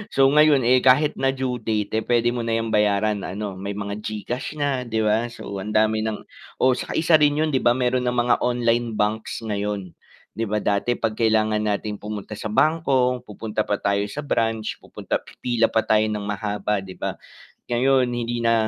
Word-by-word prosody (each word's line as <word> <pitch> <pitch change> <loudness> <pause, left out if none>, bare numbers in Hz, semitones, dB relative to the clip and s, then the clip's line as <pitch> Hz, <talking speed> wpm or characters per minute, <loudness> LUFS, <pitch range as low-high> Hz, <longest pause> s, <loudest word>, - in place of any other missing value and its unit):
so 135 - +3
ngayon 150 -2 +6
eh, 130 - +6
kahit 145 +4 +4
na 135 - +3
due 125 -2 -1
date 105 -2 -1
eh, - - -5
pwede 120 -1 +3
mo 120 - -2
na 115 - -1
yung 115 0 -3
bayaran 105 0 +2
ano, 105 +2 -4 0.2
may 100 +1 -3
mga 100 0 -4
Gcash 110 +4 -4
na, 145 0 +1 0.2
'di 110 - -1
ba 105 +1 +3 0.2
so - - -10 0.2
ang 105 +2 -5
dami 110 0 +2
ng 110 -1 -2 0.4
oo 130 - +5
saka - - -5
isa 165 0 +5
rin 145 0 +4
'yun 155 - +1
'di 130 - +2
ba 120 - +6
meron 125 0 +1
ng 125 0 0
mga 120 - +3
online 120 -1 +1
banks 105 +1 -1 0.2
ngayon, 105 0 -2 0.6
'di 115 - -1
ba 105 - +1
dati 100 +4 -1
'pag 110 -1 0
kailangan 110 -1 +2
nating 105 0 -2
pumunta 105 0 -6
sa 110 - -3
bangko, 135 -6 +2
pupunta 105 +1 -3
pa 105 - +2
tayo 100 0 +2
sa 150 - -3
branch, 110 -1 0 0.2
pupunta - - -4
pipila 120 -2 0
pa 110 - +4
tayo 110 0 +4
nang 105 -1 -3
mahaba 105 0 -2
'di 95 -1 -10
ba, - - 0 0.6
ngayon 130 +1 +3
hindi 120 0 -2
na 115 - +4
110 Hz, 200 wpm, -23 LUFS, 105-125 Hz, 0.6 s, ngayon